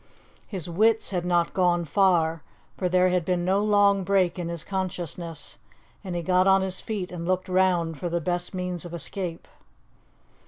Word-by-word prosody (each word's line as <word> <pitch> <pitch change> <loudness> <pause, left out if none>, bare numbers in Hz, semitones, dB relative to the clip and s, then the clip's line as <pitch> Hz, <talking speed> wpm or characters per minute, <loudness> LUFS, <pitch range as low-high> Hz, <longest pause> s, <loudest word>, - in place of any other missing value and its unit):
His 185 -6 -4
wits 215 +6 +2
had 180 -2 -2
not 175 -1 +1
gone 175 -2 +2
far, 165 -1 +2 0.3
for 180 - -1
there 185 +1 +4
had 180 -1 +1
been 175 0 -1
no 190 +2 +2
long 205 -2 +4
break 185 -2 +1
in 175 - -3
his 170 -2 -4
consciousness, 175 -4 -4 0.4
and 185 -3 -5
he 170 - -2
got 185 +2 +3
on 195 0 +5
his 190 -1 -2
feet 200 -6 -4
and 170 -1 -5
looked 185 +1 0
round 180 -4 +1
for 175 - -3
the 170 +1 0
best 175 +2 -2
means 180 -2 -4
of 175 -1 -7
escape. 170 0 -5
180 Hz, 175 wpm, -26 LUFS, 170-190 Hz, 0.4 s, on